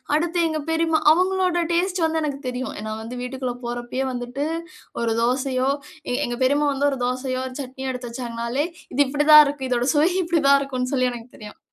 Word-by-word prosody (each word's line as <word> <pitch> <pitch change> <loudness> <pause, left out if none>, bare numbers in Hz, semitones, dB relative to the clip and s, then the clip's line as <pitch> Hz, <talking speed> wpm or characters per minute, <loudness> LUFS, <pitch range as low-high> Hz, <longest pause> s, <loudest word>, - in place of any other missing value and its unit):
அடுத்து 340 +3 0
எங்க 315 -1 -2
பெரிம்மா 325 -1 +2
அவங்களோட 365 +1 +2
டேஸ்ட் 360 +1 +1
வந்து 320 0 0
எனக்கு 285 -2 -3
தெரியும். 250 +1 -3
ஏனா 215 0 -5
வந்து 230 +3 -7
வீட்டுக்குள்ள 255 0 -3
போகிறப்பயே 240 +2 -3
வந்துட்டு 250 +3 -4 0.6
ஒரு 230 -1 +1
தோசையோ 255 +1 +1 0.6
எங்க 240 0 -4
பெரிம்மா 285 +3 +3
வந்து 280 +1 +1
ஒரு 270 - -4
தோசையோ, 255 +1 -2
ஒரு 255 - -9
சட்னியோ 265 0 -6
எடுத்து 250 -1 -6
வச்சாங்கனாலே, 235 +3 -2 0.3
இது 275 - +2
இப்படிதா 295 +2 +7
இருக்கு. 280 -2 -4
இதோட 245 0 +1
சுவை 300 +4 +4
இப்படிதா 325 -5 +3
இருக்குன்னு 255 -2 -3
சொல்லி 255 -2 +2
எனக்கு 235 -1 -9
தெரியும். 210 -1 -11
265 Hz, 175 wpm, -23 LUFS, 250-305 Hz, 0.6 s, இப்படிதா